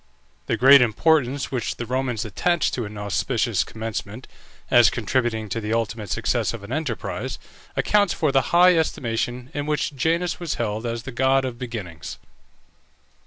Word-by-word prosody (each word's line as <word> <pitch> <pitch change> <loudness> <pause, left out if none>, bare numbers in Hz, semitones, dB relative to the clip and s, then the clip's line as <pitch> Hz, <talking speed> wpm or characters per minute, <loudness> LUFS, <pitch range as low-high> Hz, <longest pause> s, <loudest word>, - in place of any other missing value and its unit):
The - - 0
great 135 +2 +8
importance 135 +3 +2
which 125 -4 -2
the 120 - -5
Romans 125 -2 -2
attached 170 - 0
to 120 - -2
an 105 0 -8
auspicious 110 +2 0
commencement, 110 +1 -6 0.4
as 120 -1 +7
contributing 115 -1 -1
to 115 - -3
the 105 +1 -2
ultimate 115 -2 -2
success - - 0
of 110 - -10
an 100 - -9
enterprise, 140 - -3 0.4
accounts 205 -3 +2
for 155 -3 0
the 135 -2 +1
high 180 +1 +6
estimation 125 -4 -2
in 145 0 -3
which 150 -1 -1
Janus 170 +5 0
was 170 -3 -3
held 110 0 -2
as 115 -1 -4
the 135 - -7
god 130 +2 +2
of 125 -2 -5
beginnings. 100 - -6
120 Hz, 160 wpm, -23 LUFS, 110-140 Hz, 0.4 s, great